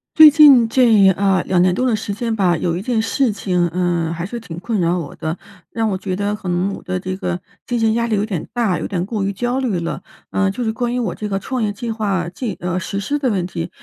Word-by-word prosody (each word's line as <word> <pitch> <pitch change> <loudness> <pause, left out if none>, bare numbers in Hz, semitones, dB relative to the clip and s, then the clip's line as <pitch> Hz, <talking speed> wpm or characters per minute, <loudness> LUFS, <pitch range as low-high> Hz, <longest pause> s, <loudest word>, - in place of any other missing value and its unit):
最 310 -2 +10
近 280 -6 +7
这， 225 -5 +5
啊， 190 -1 +1
2 180 -2 +2
年 180 0 +3
多 255 - 0
的 245 -3 +2
时 210 -1 -4
间 225 +2 -2
吧， 180 -5 +2
有 170 +1 -1
一 180 - -3
件 235 +1 0
事 230 +2 +1
情， 180 -4 0
呃， 175 -1 -1
还 170 +1 -4
是 235 +5 -5
挺 170 -8 -9
困 215 +3 -2
扰 170 +1 +1
我 160 -5 -6
的。 160 +2 -4 0.3
让 225 -1 -1
我 195 - -1
觉 185 0 -3
得 205 +2 -1
可 200 -3 -6
能 180 +3 0
我 - - -8
的 185 0 -3
这 185 0 -4
个 180 -2 -3 0.3
精 240 -1 -1
神 225 -1 +2
压 235 +1 0
力 220 - 0
有 205 0 0
点 190 -7 -4
大， 225 -7 0
有 - - -3
点 180 -3 -2
过 210 -1 -3
于 195 - 0
焦 245 +6 -2
虑 230 -9 -1
了。 170 +1 -4 0.3
呃， 200 -1 +1
就 225 +6 -3
是 220 - 0
关 240 +1 -2
于 - - 0
我 210 -8 -2
这 210 - -5
个 195 - -1
创 255 +5 -3
业 210 -2 0
计 225 +3 -5
划 200 -5 -1
进 205 +2 -5
呃， 180 +1 -2
实 195 +1 -4
施 285 +9 -2
的 270 -3 +1
问 190 -5 0
题。 170 -1 -5
200 Hz, 285 characters per minute, -19 LUFS, 180-230 Hz, 0.3 s, 最